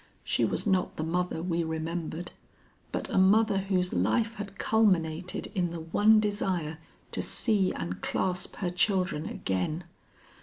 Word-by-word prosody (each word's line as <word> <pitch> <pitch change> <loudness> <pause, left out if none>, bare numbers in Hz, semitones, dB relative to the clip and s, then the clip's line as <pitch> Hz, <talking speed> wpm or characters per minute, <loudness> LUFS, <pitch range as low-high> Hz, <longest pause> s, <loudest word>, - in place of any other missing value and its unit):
She - - 0
was - - -2
not 190 -3 +1
the 155 - -3
mother 170 0 -1
we 170 -1 0
remembered, 160 +1 -4 0.6
but - - -3
a - - +3
mother 205 +2 +4
whose 185 -2 0
life 220 - +1
had 200 -1 -7
culminated 180 -6 +1
in 180 -4 0
the 170 -1 -6
one 210 +7 +4
desire 185 -7 -1 0.3
to - - -1
see 205 -5 +2
and 90 +1 -5
clasp 180 -1 -1
her 180 -3 -2
children 180 -3 +1
again. 95 - -2
180 Hz, 145 wpm, -29 LUFS, 160-200 Hz, 0.6 s, mother